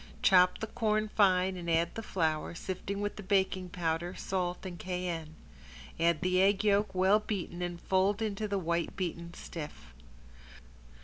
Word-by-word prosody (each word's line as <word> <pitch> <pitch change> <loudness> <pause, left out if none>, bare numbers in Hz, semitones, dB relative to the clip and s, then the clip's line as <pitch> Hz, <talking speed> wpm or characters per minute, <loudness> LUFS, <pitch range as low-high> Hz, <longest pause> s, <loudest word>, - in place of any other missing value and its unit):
Chop 180 -2 +6
the 220 - -3
corn 215 -1 0
fine 190 -3 +3
and 175 -2 -5
add 165 +1 +2
the 225 - -5
flour, 160 -6 -1
sifted 190 +3 -4
with 205 0 -3
the - - -5
baking 190 -1 +1
powder, 170 0 -2
salt 180 -1 -2
and 175 -2 -6
cayenne. 175 -3 -4 0.6
Add 165 -1 +2
the 185 0 +2
egg 195 +1 +3
yolk, 205 -1 +2
well 190 +3 +5
beaten 185 -5 -4
and 175 -1 -3
fold 190 +3 +2
in 220 -2 -1
the 205 -1 -2
white 170 -2 -1
beaten 170 -2 -4
stiff. 150 - -8
185 Hz, 160 wpm, -31 LUFS, 170-200 Hz, 0.6 s, Chop